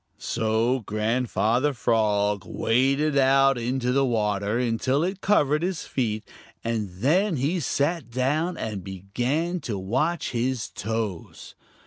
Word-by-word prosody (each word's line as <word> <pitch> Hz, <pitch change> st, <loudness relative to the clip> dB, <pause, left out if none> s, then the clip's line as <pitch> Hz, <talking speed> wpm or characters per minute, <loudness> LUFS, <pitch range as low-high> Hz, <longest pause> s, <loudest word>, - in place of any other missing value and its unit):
So 115 Hz, +4 st, 0 dB
Grandfather 115 Hz, +4 st, 0 dB
Frog 105 Hz, -4 st, +1 dB
waded 135 Hz, +6 st, +1 dB
out 135 Hz, -1 st, +4 dB
into 125 Hz, +1 st, -1 dB
the 135 Hz, +2 st, +3 dB
water 105 Hz, -3 st, 0 dB
until 125 Hz, +4 st, +1 dB
it 190 Hz, +2 st, -3 dB
covered 150 Hz, -7 st, +3 dB
his 180 Hz, -1 st, -2 dB
feet, 110 Hz, -5 st, -2 dB, 0.4 s
and 115 Hz, -3 st, -2 dB
then 160 Hz, -, +1 dB
he 150 Hz, +7 st, 0 dB
sat 150 Hz, -1 st, -1 dB
down 150 Hz, +8 st, 0 dB
and 105 Hz, -4 st, -4 dB
began 120 Hz, -, -2 dB
to 110 Hz, -10 st, -4 dB
watch 130 Hz, -, -1 dB
his 120 Hz, -1 st, -1 dB
toes. 110 Hz, -4 st, -5 dB
125 Hz, 120 wpm, -25 LUFS, 110-145 Hz, 0.4 s, out